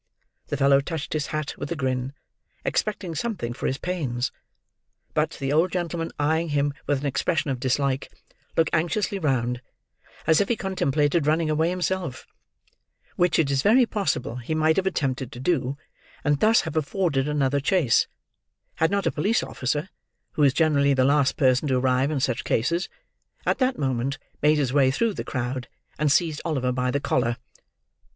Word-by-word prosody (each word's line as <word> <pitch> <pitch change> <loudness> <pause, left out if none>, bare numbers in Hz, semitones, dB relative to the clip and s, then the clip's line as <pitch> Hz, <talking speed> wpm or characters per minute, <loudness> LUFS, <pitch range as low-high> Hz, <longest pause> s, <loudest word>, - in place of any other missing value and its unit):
The 145 - -2
fellow 140 0 +5
touched 160 0 -4
his 150 -2 -1
hat 155 -2 -3
with 140 - -5
a - - 0
grin, 130 -2 -2 0.5
expecting 200 -5 -1
something 165 - -3
for 125 - -3
his 130 - -1
pains; 140 -9 -2 0.8
but, - - 0
the 135 +1 -1
old 165 +4 +3
gentleman, 170 -2 -2
eyeing 160 +3 +1
him 145 -1 +1
with 145 -2 +1
an - - -4
expression 145 +2 0
of 130 - -3
dislike, 135 +1 0 0.5
look 160 - +4
anxiously 190 +5 0
round, 125 -6 0 0.6
as 160 +2 +4
if 200 - -1
he 235 - +2
contemplated 150 -6 0
running 155 0 +2
away 160 +2 +2
himself: 180 -6 -2 0.9
which 175 -2 +2
it 145 -4 +2
is 135 -1 +2
very 235 - +5
possible 185 - -2
he 125 +6 -3
might 155 0 +3
have 190 0 +1
attempted 135 -7 -1
to 120 - -8
do, 140 -2 0 0.5
and 145 -2 +2
thus 220 +5 +5
have 160 -1 -6
afforded 155 -3 0
another 145 -2 +1
chase, 145 -4 +3 0.7
had 160 - +3
not 200 +1 0
a - - +2
police 205 +10 +1
officer 145 +6 -2 0.4
(who - - -2
is 140 -2 +6
generally 140 -2 +3
the 130 -1 +3
last 140 0 +3
person 130 +1 +3
to 130 -2 +2
arrive 130 +1 +2
in 155 -3 -1
such 130 -3 0
cases) 170 +10 0 0.6
at - - +1
that 260 0 +1
moment 135 0 -1 0.2
made 150 +1 +4
his 135 -4 0
way 140 -2 +4
through 215 +11 +1
the - - -4
crowd, 125 0 -3 0.3
and 150 -1 +2
seized 155 -1 +2
Oliver 135 -6 0
by 125 0 0
the 140 - 0
collar. 120 -4 0
145 Hz, 175 wpm, -25 LUFS, 130-170 Hz, 0.9 s, is